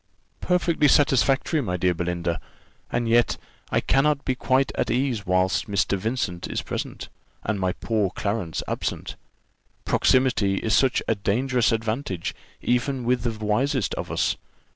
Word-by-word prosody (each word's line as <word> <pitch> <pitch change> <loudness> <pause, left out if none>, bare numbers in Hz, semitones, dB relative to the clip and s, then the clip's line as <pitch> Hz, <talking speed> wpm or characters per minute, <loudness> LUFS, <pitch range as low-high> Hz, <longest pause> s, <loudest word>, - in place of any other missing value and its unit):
"Perfectly 170 -4 +2
satisfactory, 140 +2 +3
my 90 -7 -2
dear 90 0 +2
Belinda; 85 0 -2 0.5
and 120 - 0
yet 120 +1 +3 0.3
I - - +1
cannot 140 +1 +2
be 130 - +1
quite 130 +1 +1
at - - -1
ease 120 -4 0
whilst 95 0 +2
Mr. 100 -1 +1
Vincent 100 -4 -2
is - - -3
present, - - -5 0.4
and 105 -1 -1
my 95 -1 0
poor 105 -2 0
Clarence 100 -4 -3
absent: - - -3 0.7
proximity 125 -7 +3
is 110 +2 -1
such 130 -2 +3
a - - +3
dangerous 120 +4 +1
advantage 115 - -2 0.3
even 125 +1 0
with 125 +1 +1
the 110 -3 -3
wisest 130 +3 +1
of - - -4
us. - - +1
115 Hz, 140 wpm, -24 LUFS, 100-130 Hz, 0.7 s, satisfactory